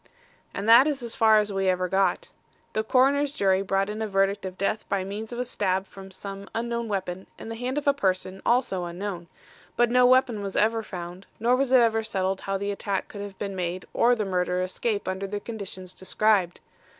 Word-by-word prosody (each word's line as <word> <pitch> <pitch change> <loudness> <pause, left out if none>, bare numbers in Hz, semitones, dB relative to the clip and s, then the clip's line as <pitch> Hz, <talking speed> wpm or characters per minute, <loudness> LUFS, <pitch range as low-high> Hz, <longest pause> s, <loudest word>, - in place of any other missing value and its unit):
"And 200 +2 -4
that 235 +5 +8
is 280 -4 -2
as 235 -1 -3
far 220 -1 +5
as 210 -1 +1
we 195 -1 +1
ever 185 0 +1
got. 190 +1 +1 0.4
The 215 - 0
coroner's 275 +4 +3
jury 195 -7 +2
brought 195 0 0
in 210 +1 -5
a 220 - -1
verdict 195 -1 +1
of 185 0 -9
death 210 +2 -1
by 195 -1 0
means 210 +4 -6
of 240 - -5
a 250 - -1
stab 190 -4 -1
from 195 0 -12
some 195 +1 -8
unknown 235 0 -2
weapon 190 -2 -4
in - - -8
the 225 - -4
hand 250 +4 -3
of 295 - -2
a 280 - +5
person 190 -5 -1
also 235 -7 +1
unknown, 175 0 -5 0.5
but 240 -1 +3
no 250 0 +6
weapon 255 -4 +3
was 195 -1 -5
ever 225 +1 +2
found, 180 -2 -8
nor 240 +3 +3
was 265 0 0
it 260 -2 +7
ever 225 -1 +3
settled 190 -3 -2
how 195 0 -2
the 200 +1 -2
attack 200 -1 -3
could 205 - -8
have 200 -1 -8
been 200 -1 -4
made 180 0 -3
or 245 +1 +4
the 215 -3 -2
murderer 180 -1 0
escape 205 +3 -2
under 190 +1 -2
the 205 +1 -4
conditions 200 -4 -7
described. 190 -2 +1
200 Hz, 215 wpm, -26 LUFS, 190-230 Hz, 0.5 s, that